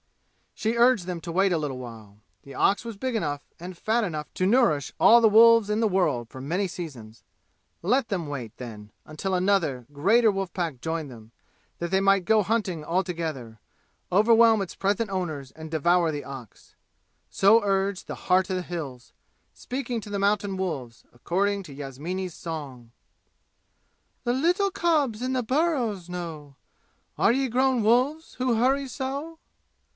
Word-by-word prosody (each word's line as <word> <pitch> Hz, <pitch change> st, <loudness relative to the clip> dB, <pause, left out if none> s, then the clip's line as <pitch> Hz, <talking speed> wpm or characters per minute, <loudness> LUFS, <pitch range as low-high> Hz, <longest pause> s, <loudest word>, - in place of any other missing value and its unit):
She 225 Hz, +2 st, -1 dB
urged 240 Hz, -6 st, +4 dB
them 175 Hz, -2 st, -5 dB
to 170 Hz, -, -6 dB
wait 190 Hz, +3 st, +2 dB
a 170 Hz, -, +2 dB
little 145 Hz, -4 st, -3 dB
while. 110 Hz, -5 st, -11 dB, 0.2 s
The 140 Hz, -, -12 dB
ox 200 Hz, -, +2 dB
was 230 Hz, -2 st, -6 dB
big 255 Hz, +3 st, -3 dB
enough 145 Hz, -9 st, -2 dB, 0.2 s
and 175 Hz, +1 st, -8 dB
fat 225 Hz, +5 st, 0 dB
enough 155 Hz, -6 st, -4 dB
to 185 Hz, -, 0 dB
nourish 190 Hz, -, +2 dB
all 235 Hz, -, +7 dB
the 225 Hz, -, +6 dB
wolves 230 Hz, 0 st, +6 dB
in 210 Hz, +1 st, 0 dB
the 225 Hz, -, +3 dB
world 155 Hz, -, 0 dB
for 130 Hz, -, -10 dB
many 180 Hz, +8 st, -1 dB
seasons. 125 Hz, -11 st, -9 dB, 0.6 s
Let 235 Hz, +7 st, +1 dB
them 180 Hz, -6 st, -2 dB
wait, 130 Hz, -7 st, -6 dB
then, 105 Hz, -4 st, -9 dB
until 155 Hz, +5 st, -4 dB
another, 180 Hz, -9 st, +1 dB
greater 215 Hz, +10 st, +3 dB
wolf 195 Hz, -2 st, -4 dB
pack 165 Hz, -9 st, -3 dB
joined 160 Hz, -2 st, -3 dB
them, 115 Hz, -3 st, -13 dB, 0.5 s
that 170 Hz, -, -3 dB
they 190 Hz, +1 st, +2 dB
might 195 Hz, -1 st, +3 dB
go 215 Hz, +2 st, +4 dB
hunting 195 Hz, -7 st, -1 dB
all 175 Hz, +5 st, 0 dB
together, 155 Hz, -, -5 dB, 0.5 s
overwhelm 225 Hz, +2 st, +5 dB
its 190 Hz, -, -5 dB
present 205 Hz, +2 st, 0 dB
owners 155 Hz, -8 st, -4 dB
and 160 Hz, 0 st, -10 dB
devour 170 Hz, +1 st, +2 dB
the 145 Hz, -1 st, -5 dB
ox! 130 Hz, -6 st, -11 dB, 0.5 s
So 210 Hz, +4 st, +5 dB
urged 195 Hz, -1 st, 0 dB
the -, -, -5 dB
"Heart 185 Hz, +1 st, +3 dB
of -, -, 0 dB
the 185 Hz, -, -1 dB
Hills," 145 Hz, -9 st, -7 dB, 0.4 s
speaking 250 Hz, -2 st, -4 dB
to 210 Hz, -, -10 dB
the 200 Hz, -, -2 dB
mountain 200 Hz, -1 st, 0 dB
wolves, 140 Hz, -11 st, -5 dB
according 195 Hz, +10 st, -1 dB
to 155 Hz, -6 st, -11 dB
Yasmini's 155 Hz, +7 st, -5 dB
song. 140 Hz, -8 st, -7 dB, 1.3 s
"The 240 Hz, -, +1 dB
little 355 Hz, +9 st, +2 dB
cubs 300 Hz, -, +1 dB
in 255 Hz, +1 st, -1 dB
the 255 Hz, -1 st, 0 dB
burrows 245 Hz, -, 0 dB
know. 160 Hz, -5 st, -7 dB, 0.6 s
Are -, -, +4 dB
ye 265 Hz, +2 st, +1 dB
grown 255 Hz, 0 st, +2 dB
wolves, 260 Hz, +9 st, +1 dB
who 250 Hz, -2 st, 0 dB
hurry 270 Hz, +4 st, +2 dB
so?" 280 Hz, +5 st, -5 dB
185 Hz, 165 wpm, -26 LUFS, 150-225 Hz, 1.3 s, all